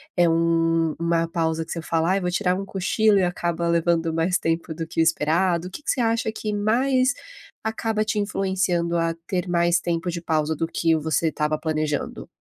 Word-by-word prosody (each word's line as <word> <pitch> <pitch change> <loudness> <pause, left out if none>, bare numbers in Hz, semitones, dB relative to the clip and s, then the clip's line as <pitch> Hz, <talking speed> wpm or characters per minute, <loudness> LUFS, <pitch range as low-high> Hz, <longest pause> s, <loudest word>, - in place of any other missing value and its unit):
é 175 -2 +4
uma 165 0 +1
pausa 165 -1 -1
que - - -10
você 165 - -3
fala: 165 +2 0
"Ai, 195 +1 +1
vou 180 - -1
tirar 180 0 +1
um 195 - -4
cochilo 200 +3 +2
e 190 - +3
acaba 170 -1 -1
levando 170 -1 +1
mais 165 +3 +1
tempo 165 0 -2
do 165 0 -4
que 160 - -5
o - - +5
esperado?". 170 +2 +1
O - - -21
que 190 - -8
que - - -6
você 255 - +1
acha 230 -1 +1
que 215 -1 -4
mais 255 +5 +2 0.5
acaba 220 -1 -1
te 215 0 -1
influenciando 190 -4 0
a 165 0 0
ter 185 -1 -2
mais 170 0 +3
tempo 170 +1 -2
de 170 0 -5
pausa 160 -1 0
do 165 - -2
que 165 0 +1
você 160 +1 0
estava 155 0 -1
planejando? 155 -2 -2
170 Hz, 200 wpm, -23 LUFS, 165-190 Hz, 0.5 s, o